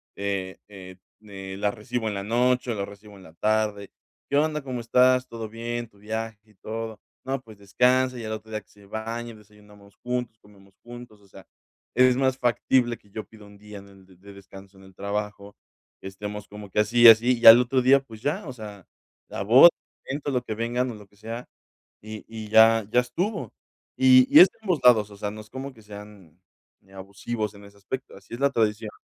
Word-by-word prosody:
eh, 100 -2 -4
eh, 95 -2 -12 0.2
mm, 105 0 -19
eh, 95 -1 -8
la 100 +1 0
recibo 115 +1 -4
en - - -4
la 100 - -4
noche 125 +3 +1
o - - -3
la 100 -1 -3
recibo 100 +1 -14
en 95 - -16
la 80 - -16
tarde. 105 +1 -1 0.4
¿Qué 140 - +1
onda? 150 0 0
¿Cómo 130 -3 -5
estás? 125 +2 +3
Todo 115 -2 -7
bien, 120 +1 -5
tu 100 - -26
viaje 110 +1 -5
y - - -28
todo, 110 +2 -7 0.2
¿no? 135 0 -3
Pues 110 -4 -16
descansa", 125 +5 +1
y - - -7
al 110 - -5
otro 110 0 -9
día 110 0 -4
que - - -36
se 100 -1 -20
baña, 115 +3 -6
desayunamos 105 -1 -20
juntos, 125 -2 -4
comemos 100 -2 -22
juntos. 120 -3 -12
O 100 - -23
sea, - - -15 0.5
es 125 0 +5
más 130 -1 +1
factible 120 0 +1
que 105 - -27
yo 110 +2 -7
pida 110 -2 -17
1 100 0 -16
día 105 0 -11
en 100 0 -16
el 95 -1 -19 0.2
de 100 0 -13
descanso 95 0 -15
en 95 - -17
el 95 - -17
trabajo, 100 0 -5 0.5
estemos 105 +2 -8
como 105 -1 -11
que - - -1
así 120 +3 0
y - - +11
así, 115 +2 +5
y - - -3
al 115 +1 +11
otro 130 +1 0
día, 135 +2 +5
pues 115 -5 -14
ya, 160 - -3
o 130 - -6
sea, 105 -5 -11 0.4
la - - -6
boda, 125 +11 +8 0.4
el - - -6
evento, 145 0 -4
lo 125 -2 -1
que 110 - -5
vengan 120 +3 -2
o - - -9
lo 105 -1 -14
que 100 +1 -29
sea, 115 +3 -8 0.6
y 110 0 -9
y 110 -1 -8
ya, 110 0 +5
ya 125 - +4
estuvo, 130 - -4 0.4
y 130 -1 +6
y - - +8
es 185 - +9
de - - -32
ambos 180 -8 -1
lados. 110 -4 +5
O 100 - -13
sea, 100 0 -4
no 110 +1 -9
es 105 - -19
como 135 +3 -7
que 110 - -18
sean, 105 -5 -13 0.4
eh, 95 - -23
abusivos 100 +3 -6
en 100 0 -15
ese 100 0 -17
aspecto. 125 +6 -7
Así 100 +4 -12
es 120 - -8
la 140 0 +3
tradición. 110 -3 -1
110 Hz, 225 wpm, -25 LUFS, 100-125 Hz, 0.6 s, y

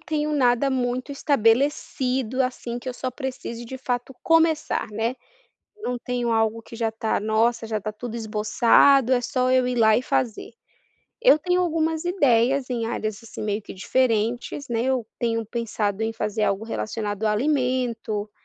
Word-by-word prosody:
tenho 305 -1 -2
nada 255 -2 +3
muito 255 +1 -1
estabelecido, 260 -1 +1
assim, 245 -1 -3
que 250 +1 -6
eu 250 - -4
só 255 - -3
precise 255 -2 -6
de 260 +3 -7
fato 250 0 -3
começar, 320 -5 +2
né, 225 +4 -1 0.6
não 250 -12 -3
tenho 245 -2 -1
algo 225 0 +1
que 230 - -13
já 225 -1 -1
tá: 220 -1 -1
"Nossa, 225 +2 +1
já 220 -1 -1
tá 215 +1 -5
tudo 235 +2 -6
esboçado, 230 +4 +4
é 245 - +4
só 255 +1 0
eu 255 -1 +3
ir 250 - -1
lá 220 -2 +5
e - - -1
fazer". 240 -3 -1 0.7
Eu - - +6
tenho 360 +3 +1
algumas 320 -2 0
ideias 275 -7 +2
em 235 -2 -1
áreas, 220 -1 -3
assim, 230 - -9
meio 210 0 -1
que - - -10
diferentes, 240 +5 0
né, 230 -1 -1
eu 255 -3 0
tenho 230 -1 -1
pensado 220 -2 -2
em 225 - -1
fazer 215 -1 -2
algo 200 +1 0
relacionado 215 -2 -4
a 215 - +3
alimento, 245 -4 -1
240 Hz, 165 wpm, -24 LUFS, 225-265 Hz, 0.7 s, Eu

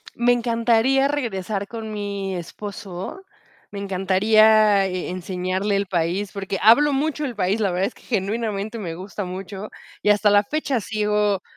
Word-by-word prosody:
Me 240 +1 +3
encantaría 240 +3 +2
regresar 210 -8 -3
con 225 -1 -7
mi 200 -2 -4
esposo. 190 - -7 0.5
Me 200 - -6
encantaría 200 +2 +4
e 185 -1 -3
enseñarle 185 +2 -2
el 200 0 0
país, 180 +3 -1
porque 195 -1 -4
hablo 280 +8 +6
mucho 300 +2 -1
del 255 -5 -3
país. 195 +2 0
La 200 -3 +1
verdad 185 +2 0
es 240 - -10
que, - - -19
genuinamente, 215 0 -2
me 180 -7 -5
gusta 190 +3 -6
mucho, 190 +3 -7 0.3
y - - +2
hasta 210 0 +4
la 205 0 +5
fecha 280 +1 -1
sigo 210 -1 0
205 Hz, 155 wpm, -22 LUFS, 190-225 Hz, 0.5 s, hablo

